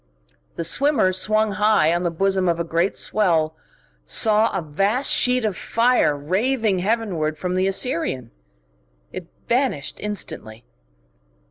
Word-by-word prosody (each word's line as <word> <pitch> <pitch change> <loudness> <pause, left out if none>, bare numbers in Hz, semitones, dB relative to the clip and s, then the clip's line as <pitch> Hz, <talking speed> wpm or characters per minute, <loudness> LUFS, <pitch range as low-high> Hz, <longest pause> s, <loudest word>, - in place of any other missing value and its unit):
The 170 - -3
swimmer, 230 - +2
swung 215 +3 +2
high 210 -5 +2
on 175 - -1
the 175 - 0
bosom 190 +2 0
of 170 0 -1
a - - 0
great 170 +3 -1
swell, 165 -7 0 0.5
saw 215 - +2
a - - -2
vast 195 - 0
sheet 250 -2 +2
of 210 -4 -1
fire 230 -8 +1
raving 205 - 0
heavenward 180 -7 -1
from 180 +3 -3
the 185 +1 +1
Assyrian. 165 - -2 0.8
It - - -7 0.2
vanished 240 - -1
instantly. 120 - -6
190 Hz, 130 wpm, -21 LUFS, 165-220 Hz, 0.8 s, swimmer